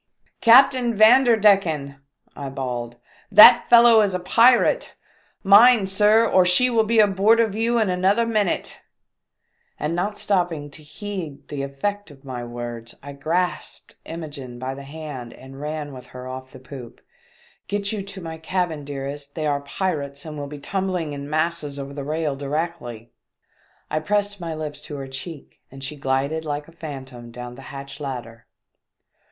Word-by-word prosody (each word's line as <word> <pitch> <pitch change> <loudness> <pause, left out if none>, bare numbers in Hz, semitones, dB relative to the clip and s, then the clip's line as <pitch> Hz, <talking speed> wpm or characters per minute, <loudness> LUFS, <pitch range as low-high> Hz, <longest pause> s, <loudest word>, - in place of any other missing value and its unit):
"Captain 245 0 +5
Vanderdecken!" 205 - +4 0.4
I 140 -1 -6
bawled, 120 -3 -5 0.4
"that 235 +4 +8
fellow 235 -2 +7
is 200 -3 0
a - - -1
pirate! 240 - +3 0.5
Mind, 205 0 +6
sir, 210 +3 +4
or 185 -3 +4
she 180 +8 +3
will 225 -2 +3
be 230 +1 0
aboard 210 +2 +4
of 225 -3 +2
you 230 +2 0
in 220 -3 +2
another 195 +6 +2
minute 215 -5 -1 0.5
!" - - -45
And 150 +3 -2
not 205 +4 -2
stopping 175 -7 -1
to 155 - -11
heed 170 -1 -8
the 145 -2 -4
effect 185 +10 -4
of 140 -1 -17
my 125 -2 -6
words, 120 -1 -7
I 140 0 -8
grasped 165 +6 -3
Imogene 145 -7 -8
by 130 +2 -4
the 140 - -9
hand 140 -4 -8
and 135 +1 -12
ran 150 -1 -5
with 125 -1 -11
her 125 0 -10
off 130 0 -8
the - - -12
poop. 130 -2 -11 0.7
"Get 205 0 -2
you 215 -2 -3
to 195 0 -9
my 160 -1 -7
cabin, 165 -2 -2
dearest, 140 0 -7
they 155 - -3
are 145 -1 0
pirates 140 -3 -4
and 155 -1 -7
will 145 -1 -5
be 145 +1 -8
tumbling 180 -1 -3
in 140 0 -7
masses 155 -2 -1
over 140 0 -7
the 140 -1 -6
rail 155 0 -2
directly." 140 -5 -5 0.8
I 155 - 0
pressed 205 +3 -1
my 165 -2 -4
lips 150 -1 -6
to 150 - -8
her 135 -1 -6
cheek 140 +3 -9
and 135 0 -11
she 140 +3 -4
glided 140 +3 -1
like 150 -1 -4
a - - -15
phantom 130 -7 -9
down 125 +1 -8
the 130 - -12
hatch 140 +1 -8
ladder. 120 -5 -7
155 Hz, 165 wpm, -22 LUFS, 140-200 Hz, 0.8 s, that